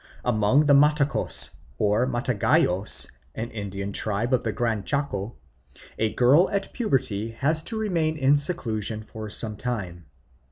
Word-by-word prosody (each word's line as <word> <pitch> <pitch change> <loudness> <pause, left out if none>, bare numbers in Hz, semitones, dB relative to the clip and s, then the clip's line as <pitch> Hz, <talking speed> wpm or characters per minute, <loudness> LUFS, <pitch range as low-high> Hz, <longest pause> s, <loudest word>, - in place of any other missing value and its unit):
Among 125 +5 +3
the 145 - +5
Matacos 145 0 +3 0.3
or 105 +4 +2
Mataguayos, 120 -6 +1 0.3
an 115 +2 -4
Indian 100 -2 -5
tribe 110 +5 -1
of 130 - +2
the 110 - -1
Gran 110 -3 -1
Chaco, 125 -7 -2 0.6
a 110 -1 +1
girl 135 - +4
at 200 -1 -3
puberty 130 - -1
has 155 +7 +1
to 220 +8 -4
remain 165 -7 0
in 140 0 +4
seclusion 110 - -2
for 110 0 -8
some 105 0 -3
time. 95 -9 -4
120 Hz, 135 wpm, -25 LUFS, 105-145 Hz, 0.6 s, the